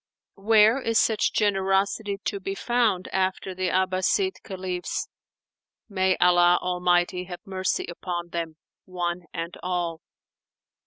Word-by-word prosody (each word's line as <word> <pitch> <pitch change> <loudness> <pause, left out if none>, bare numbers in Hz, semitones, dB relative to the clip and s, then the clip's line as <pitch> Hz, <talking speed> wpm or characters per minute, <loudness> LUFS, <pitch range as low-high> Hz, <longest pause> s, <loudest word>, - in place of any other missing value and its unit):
Where 220 +4 +5
is 230 -2 0
such 220 -2 +2
generosity 200 0 +1
to 200 - -2
be 195 0 -4
found 225 -5 +1
after 190 0 -1
the 185 0 -2
Abbaside 185 - +1
Caliphs?—May 185 +1 -4
Allah 175 0 +5
Almighty 180 0 +1
have 180 -1 -9
mercy 190 -1 -1
upon 175 0 -5
them, 165 -2 -4 0.3
one 175 -1 -3
and 165 +1 -5
all! 175 -2 -2
185 Hz, 110 wpm, -25 LUFS, 175-200 Hz, 0.3 s, Where